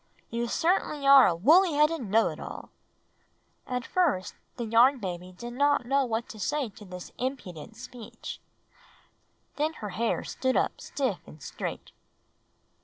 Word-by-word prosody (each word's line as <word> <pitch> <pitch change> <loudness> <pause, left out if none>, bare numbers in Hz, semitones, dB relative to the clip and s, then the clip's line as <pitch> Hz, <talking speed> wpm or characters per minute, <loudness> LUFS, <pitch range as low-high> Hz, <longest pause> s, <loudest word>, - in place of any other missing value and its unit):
You 235 +1 -1
certainly 315 -1 0
are 275 -1 +9
a 175 - +1
woolly 325 - +5
headed 300 +1 +3
know 225 0 +2
it - - -8
all!" - - -8 1.0
At 250 0 -3
first 290 - +1 0.2
the 240 - -3
Yarn 235 +5 +5
Baby 180 -4 -5
did 240 +6 -8
not 285 0 +2
know 275 +2 +2
what 230 -1 -2
to 215 - -9
say 275 +5 -1
to 210 +1 -14
this 180 -1 -9
impudent 220 - -5
speech. 235 -1 -9 1.2
Then 305 +2 0
her 210 -9 -6
hair 225 +4 -1
stood 260 -1 -1
up - - 0
stiff 260 -10 -2
and 155 - -13
straight. 135 - -6
240 Hz, 150 wpm, -28 LUFS, 210-280 Hz, 1.2 s, are